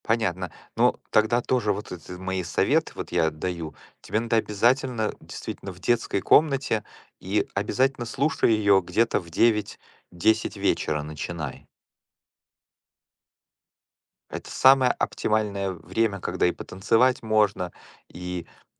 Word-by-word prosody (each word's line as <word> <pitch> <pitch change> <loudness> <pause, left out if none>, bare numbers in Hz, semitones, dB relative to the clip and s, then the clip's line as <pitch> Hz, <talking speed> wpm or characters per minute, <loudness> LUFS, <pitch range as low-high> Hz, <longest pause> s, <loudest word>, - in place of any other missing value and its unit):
Понятно. 95 -6 0 0.2
Ну, - - +3
тогда 110 +3 +3
тоже 115 -5 +1
вот 105 +2 -7
это 90 0 -8
мои 95 0 -3
советы 85 - +1
вот - - -6
я 85 -2 +2
даю: 80 0 -5 0.3
тебе 110 - -1
надо 115 0 0
обязательно 115 +2 +1
действительно 100 - -7
в 90 - -14
детской 115 -3 0
комнате, 135 -7 +3 0.4
и 100 +3 -1
обязательно 125 +5 0
слушай 135 +2 +1
ее 100 -3 +4
где-то 110 +7 +1
в 85 - -12
9-10 105 0 0
вечера 75 -1 0
начинай. 75 -1 -6 2.7
Это - - -7
самое 130 -1 +5
оптимальное 100 -3 -1
время, 100 +3 -2
когда 90 +1 0
и 90 - 0
потанцевать 115 +7 +1
можно, 105 -5 +1 0.3
и, 90 -1 -6
м, - - -26
105 Hz, 120 wpm, -25 LUFS, 90-115 Hz, 2.7 s, самое